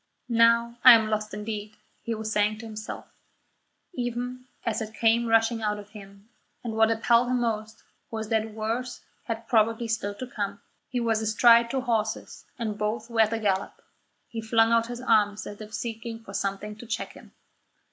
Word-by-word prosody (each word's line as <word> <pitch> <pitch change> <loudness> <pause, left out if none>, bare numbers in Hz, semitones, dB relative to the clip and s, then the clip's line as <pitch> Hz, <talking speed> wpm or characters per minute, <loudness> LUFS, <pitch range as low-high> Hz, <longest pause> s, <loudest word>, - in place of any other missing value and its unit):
"Now 235 0 +3
I 255 - +12
am 220 -1 +3
lost 215 0 -1
indeed," 210 +1 -6 0.2
he 230 - -3
was 220 0 -4
saying 210 0 +1
to 225 - -9
himself, 215 -1 -7 0.9
even 245 -1 -4 0.2
as 225 -1 -1
it 220 0 -6
came 230 +1 +3
rushing 225 0 +3
out 210 -1 0
of 205 0 -10
him, 200 -1 -13 0.4
and 230 -2 -4
what 220 0 +4
appalled 230 +2 +3
him 250 -1 +1
most 220 -2 -3 0.3
was 220 -1 -5
that 220 0 +1
worse 230 +3 -3 0.2
had 230 -1 -4
probably 225 0 +2
still 215 -2 -2
to 255 - -6
come. 205 -4 -4 0.3
He 250 - -1
was 225 -2 +1
astride 230 +2 +5
two 265 +1 -1
horses, 220 -4 -2
and 215 -3 -3
both 220 +2 -2
were 225 -1 +3
at 220 - +4
the 225 - -1
gallop. 200 -3 -1 0.5
He 225 - -5
flung 225 +1 +3
out 230 0 +3
his 240 0 -6
arms 210 -4 +2
as 205 +1 -8
if 215 0 -9
seeking 225 0 -5
for 195 - -11
something 200 +2 -3
to 240 +1 -11
check 225 - -3
him. - - -16
225 Hz, 185 wpm, -26 LUFS, 215-235 Hz, 0.9 s, I